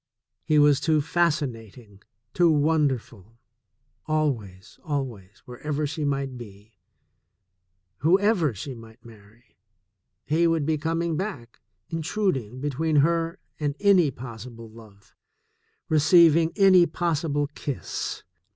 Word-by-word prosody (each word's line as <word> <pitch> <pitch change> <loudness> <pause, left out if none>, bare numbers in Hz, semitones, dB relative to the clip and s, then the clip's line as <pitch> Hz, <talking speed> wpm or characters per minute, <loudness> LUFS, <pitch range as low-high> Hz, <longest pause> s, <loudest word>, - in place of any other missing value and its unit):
He 155 - +2
was 145 -2 +5
too 155 -1 +2
fasci 155 -1 +1
nating, 110 -3 -13 0.3
too 175 -1 +4
wonderful. 140 - 0 0.7
Always, 120 -12 -3
always, 120 -10 -5
wherever 150 +4 -4
she 150 +1 -4
might 135 -3 -2
be, 105 -1 -14 1.2
whoever 185 - +2
she 130 +8 -6
might 115 0 -15
marry, 110 0 -18 0.7
he 160 +4 +2
would 165 -3 0
be 155 0 0
com 165 +2 -1
ing 165 -2 -1
back, 150 - -6 0.3
intruding 160 - -2
between 145 +3 -1
her 165 +1 -1 0.2
and 145 -2 -2
any 195 -6 +4
possible 115 -2 -10
love, 110 -1 -17 0.7
receiving 165 0 +5
any 185 -4 +6
possible 155 -4 -1
kiss. 140 -3 -5
145 Hz, 110 wpm, -25 LUFS, 115-165 Hz, 1.2 s, any